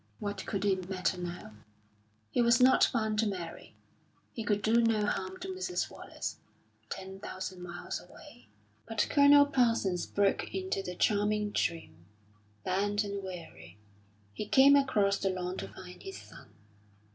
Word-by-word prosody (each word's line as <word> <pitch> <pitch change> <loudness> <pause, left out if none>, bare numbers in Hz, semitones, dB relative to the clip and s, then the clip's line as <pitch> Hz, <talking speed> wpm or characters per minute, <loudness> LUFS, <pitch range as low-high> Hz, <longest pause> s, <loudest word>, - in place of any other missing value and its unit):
What 205 0 -5
could 200 -1 -2
it 190 -2 0
matter 185 -1 -1
now? 175 -10 -6 0.8
He - - +2
was 235 0 +5
not 255 +1 +6
bound 220 -3 0
to 225 - +3
Mary; 180 -5 -6 0.6
he 225 - -4
could 205 -1 0
do 230 +3 +4
no 225 -2 +2
harm 370 - -2
to 375 - -5
Mrs. 370 -1 -2
Wallace, - - -6 0.5
ten 190 0 -7
thousand 185 -2 -6
miles 175 0 -6
away. - - -15 0.4
But 225 -2 +1
Colonel 285 0 +7
Parsons 230 -10 +1
broke 200 -1 0
into 190 0 -2
the 180 -1 -6
charming 210 +1 +1
dream. 125 - -2 0.6
Bent 205 +3 0
and 200 -1 -4
weary, 100 - -9 0.6
he 210 - -5
came 275 +5 +7
across 210 -8 +2
the 195 - 0
lawn 180 0 -3
to - - -5
find 180 -1 -12
his 390 0 -8
son. - - -14
200 Hz, 150 wpm, -31 LUFS, 185-230 Hz, 0.8 s, Colonel